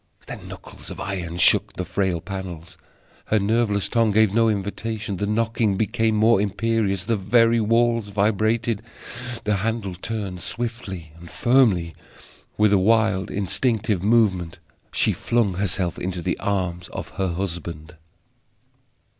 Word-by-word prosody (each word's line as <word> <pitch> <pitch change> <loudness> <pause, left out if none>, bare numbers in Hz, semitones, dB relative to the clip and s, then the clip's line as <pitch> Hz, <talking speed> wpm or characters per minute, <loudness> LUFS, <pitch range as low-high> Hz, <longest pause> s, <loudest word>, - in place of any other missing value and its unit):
Then - - -8
knuckles - - -11
of - - -8
iron 90 -3 -4
shook 85 - +4
the 90 - -4
frail 95 -2 -1
panels. 90 -4 -7 0.5
Her 110 - +2
nerveless 105 -1 +1
tongue 115 -2 +2
gave 105 -1 +3
no 115 0 +4
invitation. 105 0 -3
The 105 - -2
knocking 110 -1 +1
became 110 +1 +1
more 110 -1 +4
imperious; 105 -2 0
the 115 +3 0
very 115 +3 +3
walls 115 0 +2
vibrated. 110 +2 +1 0.6
The 105 -1 +1
handle 110 -1 -2
turned, 95 -1 -5
swiftly 110 -9 -5
and 85 0 -12
firmly. 110 -10 +3 0.6
With 105 -1 +4
a 100 - +5
wild 110 -1 +2
instinctive 105 +1 0
movement 100 -6 +2 0.3
she - - +2
flung 115 -5 +1
herself 90 -2 -1
into 90 -1 -4
the - - -1
arms 90 -3 -2
of - - -7
her 95 -3 0
husband. 85 -2 -5
100 Hz, 135 wpm, -23 LUFS, 95-115 Hz, 0.6 s, a